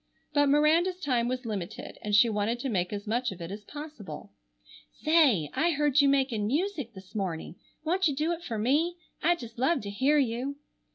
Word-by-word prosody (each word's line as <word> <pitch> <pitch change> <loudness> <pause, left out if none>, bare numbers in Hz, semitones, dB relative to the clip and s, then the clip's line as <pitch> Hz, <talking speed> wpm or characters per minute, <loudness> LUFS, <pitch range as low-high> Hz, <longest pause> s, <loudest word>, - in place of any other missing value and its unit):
But 290 -1 +4
Miranda's 325 +6 +3
time 250 -7 +1
was 255 0 -3
limited, 200 -6 -5
and 210 -1 0
she 225 +3 +7
wanted 220 +2 -1
to 270 - -2
make 180 -5 0
as 205 -1 -5
much 240 +3 0
of 190 - -9
it 170 +1 -6
as 205 +1 -7
possible. 210 - -9 0.6
"Say, 275 - +3
I 335 +1 +2
heard 295 -1 +3
you 280 - +4
making 260 -7 +1
music 290 - -2
this 190 +1 -13
morning. 180 -5 -4 0.3
Won't 365 +3 +2
you 290 - -1
do 310 +4 0
it 340 0 -4
for 230 -8 -4
me? 300 +11 +1 0.2
I'd 345 0 +3
just 235 -5 -10
love 270 +3 +2
to 200 - -6
hear 270 +9 +3
you." 260 +1 0
255 Hz, 195 wpm, -28 LUFS, 210-300 Hz, 0.6 s, she